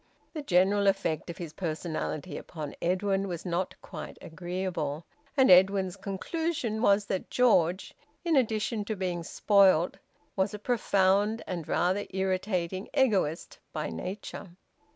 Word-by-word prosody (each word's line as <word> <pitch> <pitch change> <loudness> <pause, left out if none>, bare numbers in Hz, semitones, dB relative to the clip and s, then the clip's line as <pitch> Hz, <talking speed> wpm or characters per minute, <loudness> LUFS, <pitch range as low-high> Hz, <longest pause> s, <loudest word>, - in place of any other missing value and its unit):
The 310 - -4
general 200 -3 +3
effect 190 -5 0
of 170 - -6
his 165 -3 -7
personality 160 -1 -3
upon 150 -4 -6
Edwin 195 +2 +1
was 175 -2 -5
not 180 +1 -1
quite - - -8
agreeable, 175 -3 -4 0.3
and 265 -5 +6
Edwin's 190 0 +5
conclusion 220 - -2
was 200 -3 +4
that 190 -2 -3
George, 185 -7 +2 0.3
in 335 -2 +2
addition 220 -3 +1
to 220 - -2
being 180 -3 -2
spoiled, 190 -2 +3 0.4
was 195 +2 0
a - - -5
profound 205 -1 +2
and 170 -4 -5
rather 185 +4 +1
irritating 190 0 -1
egoist 195 - +1
by - - -3
nature. 185 - -6
190 Hz, 130 wpm, -29 LUFS, 175-205 Hz, 0.4 s, and